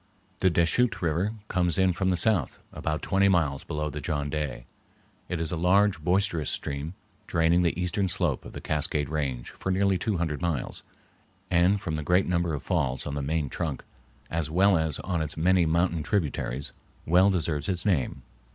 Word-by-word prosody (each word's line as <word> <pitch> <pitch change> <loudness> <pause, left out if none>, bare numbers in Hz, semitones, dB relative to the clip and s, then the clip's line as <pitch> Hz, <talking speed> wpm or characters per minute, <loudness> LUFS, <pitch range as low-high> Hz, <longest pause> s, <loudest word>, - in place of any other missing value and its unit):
The 95 - +4
Deschutes 85 +7 +2
River 85 +7 0
comes 90 -4 0
in 95 -1 +3
from 95 +2 0
the 90 - +1
south 90 - +2 0.2
about 75 0 -3
twenty 100 0 +3
miles 75 -7 +1
below 75 0 -3
the 75 - -5
John 75 -1 -2
Day. 70 -6 -3 0.6
It 90 - -2
is 80 -2 -2
a - - -1
large, 90 +1 +3
boisterous 90 -4 +1
stream, 70 +5 -4 0.3
draining 85 +1 +3
the 85 -1 0
eastern 90 +2 0
slope 90 -7 -1
of - - -10
the - - -7
Cascade 75 -2 0
Range 70 -6 -3
for 95 - -4
nearly 95 0 +2
two 105 0 0
hundred 80 -3 -2
miles, 85 -7 -2 0.7
and 90 +3 +4
from 85 -5 -4
the 75 -1 -2
great 90 +5 +3
number 85 -2 0
of 70 - -6
falls 65 -1 -1
on 75 - -4
the 70 - -2
main 75 +1 -1
trunk, 75 0 -4 0.5
as 80 -2 -1
well 95 +4 +4
as 80 -3 0
on 85 -2 -1
its 75 -1 -4
many 90 +1 +3
mountain 85 0 +1
tributaries, 75 - -2 0.3
well 90 +4 +5
deserves 80 -3 -1
its 90 -2 -2
name. 85 -11 0
85 Hz, 185 wpm, -27 LUFS, 75-95 Hz, 0.7 s, well